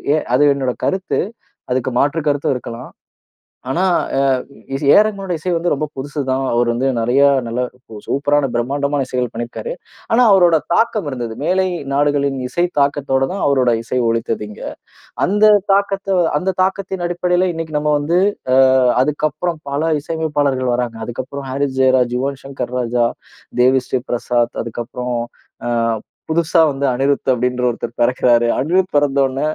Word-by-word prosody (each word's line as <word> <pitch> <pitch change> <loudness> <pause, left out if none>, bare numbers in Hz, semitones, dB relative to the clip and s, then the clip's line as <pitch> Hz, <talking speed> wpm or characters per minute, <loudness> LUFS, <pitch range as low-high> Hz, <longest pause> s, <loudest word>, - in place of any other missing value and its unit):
எ - - +2 0.2
அது 145 +2 +5
என்னோட 130 -3 -1
கருத்து. 190 0 0 0.5
அதுக்கு 130 0 0
மாற்று 150 +3 +1
கருத்தும் 140 -2 0
இருக்கலாம். 120 0 -7 0.8
ஆனா 175 +7 0 0.3
அ - - +3 0.6
இசை 135 - -4
ஏஆர் 210 - +7
ரகுமான்னுடைய 195 -5 -3
இசை 180 +4 -2
வந்து 170 +1 0
ரொம்ப 155 +2 -1
புதுசு 145 +2 -5
தான். 130 +1 0
அவர் 120 0 +2
வந்து 125 +3 0
நிறைய 120 +5 +2 0.3
நல்ல 120 +2 -2 0.5
சூப்பரான 145 0 +1
பிரம்மாண்டமான 140 +3 -1
இசைகள் 125 -2 -2
பண்ணியிருக்காரு. 120 - -5 0.4
ஆனா 245 +2 +5
அவரோட 175 -4 +5 0.2
தாக்கம் 215 -7 +1
இருந்தது. 120 -4 -4
மேலை 190 +3 +2 0.3
நாடுகளின் 140 -1 +1
இசை 175 +6 0
தாக்கத்தோட 140 -1 +1
தான் 195 - -4
அவருடைய 125 -5 +2
இசை 125 +2 -2
ஒளித்தது 115 -1 -1
இங்க. 105 - -11 0.6
அந்த 210 +3 +4 0.2
தாக்கத்த 195 -1 0 0.2
அந்த 190 +3 -1
தாக்கத்தின் 190 -1 -2
அடிப்படையில 180 +1 +1
இன்னைக்கு 160 -2 -3
நம்ம 150 0 0
வந்து 165 +5 +1 0.4
அ - - +5 0.5
அதுக்கப்பறம் 155 +3 -2
பல 160 +3 0
இசையமைப்பாளர்கள் 145 -5 -1
வராங்க. 120 -2 -2
அதுக்கப்பறம் 130 +3 -6
ஹாரிஸ் 135 0 -2
ஜெயராஜ், 130 -2 +3
யுவன் 135 0 -3
சங்கர் 135 -2 -5
ராஜா, 120 0 +1 0.5
தேவி 130 +1 +4
ஸ்ரீ 130 - -1
பிரசாத், 120 0 0
அதுக்கப்பறம் 120 +1 -4 0.5
அ - - -1 0.6
புதுசா 165 +1 +2
வந்த 140 +1 -2
அனிருத் 135 +1 0
அப்படின்ற 125 +1 -1
ஒருத்தர் 120 0 -6
பிறக்கிறார். 120 -1 +3
அனிருத் 180 +6 +1
பிறந்த 140 -1 +2
உடன, 135 +1 -3
140 Hz, 145 wpm, -18 LUFS, 125-165 Hz, 0.8 s, ஏஆர்